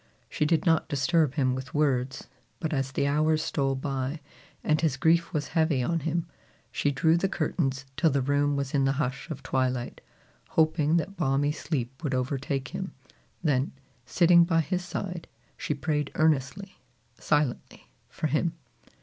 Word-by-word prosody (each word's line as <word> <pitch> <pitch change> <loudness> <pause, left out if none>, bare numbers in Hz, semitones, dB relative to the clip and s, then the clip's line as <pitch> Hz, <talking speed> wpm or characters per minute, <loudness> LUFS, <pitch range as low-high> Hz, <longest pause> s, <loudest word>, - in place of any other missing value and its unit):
She 150 - 0
did 165 +3 +2
not 165 -3 +2
disturb 145 0 +2
him 130 -4 +2
with 130 +1 -6
words; 135 -3 0 0.3
but 160 -2 -2
as 135 -2 -1
the 135 - 0
hours 155 +2 +2
stole 135 -3 0
by, 135 +2 -3 0.4
and 155 0 +2
his 155 -5 +1
grief 165 +3 +3
was 145 -3 -2
heavy 160 -5 +2
on 165 +6 0
him, 165 +2 -1 0.5
she 145 - 0
drew 160 +4 +3
the 195 +3 0
curtains 135 -8 -1
till 165 - +3
the 140 -2 +1
room 145 +1 +2
was 140 -1 -3
in 135 -2 +3
the 135 - +2
hush 140 +2 -3
of 140 -4 -6
twilight, 130 -2 -1 0.5
hoping 155 0 +3
that 170 +5 -2
balmy 145 -2 +1
sleep 140 -2 -4
would 140 -4 0
overtake 135 0 -2
him; - - -5 0.5
then, 135 -3 +1 0.3
sitting 170 +5 +5
by 165 -1 +2
his 180 +4 -2
side, 180 -2 -5 0.3
she 150 - -2
prayed 150 -1 -1
earnestly, 155 +5 0 0.4
silently, 145 -4 -1 0.2
for - - -5
him. 155 +3 +1
145 Hz, 160 wpm, -27 LUFS, 135-160 Hz, 0.5 s, sitting